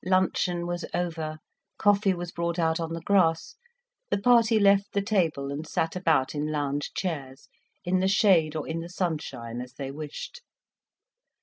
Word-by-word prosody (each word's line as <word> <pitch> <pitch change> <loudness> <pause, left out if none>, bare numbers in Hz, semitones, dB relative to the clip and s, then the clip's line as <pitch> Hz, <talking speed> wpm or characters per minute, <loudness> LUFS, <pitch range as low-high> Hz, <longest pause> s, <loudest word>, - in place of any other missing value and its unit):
Luncheon 180 -1 +1
was 175 0 -3
over, 165 -3 -3 0.4
coffee 200 -2 +3
was 175 0 -6
brought 170 0 -2
out 165 -1 +1
on 165 0 -3
the 165 - -5
grass, 165 -3 +2 0.5
the - - +1
party 230 +1 +4
left 200 0 +4
the 200 - +1
table 165 -9 0
and 150 +3 -5
sat 165 +2 -1
about 160 -7 +2
in 150 +1 -2
lounge 145 -1 -2
chairs, 140 -7 -4 0.4
in 185 +1 +2
the 190 - +2
shade 180 -6 +4
or 155 - -3
in 165 +1 -3
the 170 +1 -7
sunshine 155 -10 -3
as 125 0 -9
they 135 -1 -5
wished. 155 - -7
170 Hz, 165 wpm, -27 LUFS, 155-185 Hz, 0.5 s, party